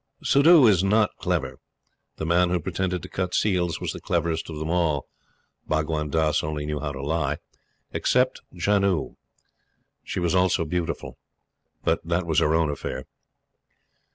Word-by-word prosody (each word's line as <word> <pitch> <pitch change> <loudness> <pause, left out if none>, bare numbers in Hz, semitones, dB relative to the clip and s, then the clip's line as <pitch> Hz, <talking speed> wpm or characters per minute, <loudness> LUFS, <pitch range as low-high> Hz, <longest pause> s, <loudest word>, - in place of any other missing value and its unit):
Suddhoo 155 +4 +6
was 100 -8 +5
not 105 +1 +2
clever. - - -2 0.6
The - - -4
man 85 +2 +3
who 90 0 +1
pretended 90 +1 -2
to - - -7
cut 90 -1 -3
seals 90 -5 +1
was - - -3
the - - -8
cleverest 85 -2 -1
of 80 - -6
them 80 +1 -3
all 85 -5 +1 0.6
Bhagwan 75 -1 -1
Dass 80 0 +1
only 75 -1 -3
knew 75 0 -3
how 75 -1 -3
to 70 -1 -7
lie 75 -1 -1 0.5
except 125 +1 +1
Janoo. 100 0 +1 0.9
She - - -4
was 85 -2 0
also 90 -2 +2
beautiful, 85 +1 -4 0.6
but - - +1
that 85 +1 -1
was 80 -3 +2
her 75 +1 +2
own 80 -2 +2
affair. 70 - -5
85 Hz, 155 wpm, -25 LUFS, 75-90 Hz, 0.9 s, Suddhoo